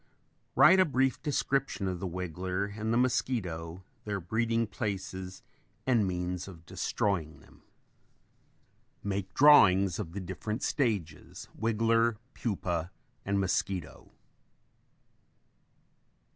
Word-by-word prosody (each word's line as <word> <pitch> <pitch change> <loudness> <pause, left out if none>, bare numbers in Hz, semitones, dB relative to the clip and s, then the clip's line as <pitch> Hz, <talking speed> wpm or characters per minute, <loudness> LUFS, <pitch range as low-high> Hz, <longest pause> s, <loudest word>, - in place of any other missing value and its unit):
Write 190 - +7
a - - +8
brief 135 -5 +1
description 135 -7 -1
of 90 -2 -3
the 95 - -3
wiggler 90 +3 -3
and 110 +1 -2
the 115 - +2
mosquito, 95 -9 -1 0.2
their 100 -1 -3
breeding 115 +5 0
places 95 -4 -5 0.4
and 115 -6 +3
means 90 0 -3
of 85 -4 -12
destroying 80 -5 -2
them. 65 - -20 1.4
Make 100 -2 -3
drawings 100 - +6
of 80 - -5
the 100 - -4
different 100 +6 -5
stages, 100 - -2
wiggler, 115 0 +2 0.2
pupa 90 -6 -2 0.3
and 100 0 0
mosquito. 95 -3 -2
100 Hz, 105 wpm, -30 LUFS, 90-115 Hz, 1.4 s, a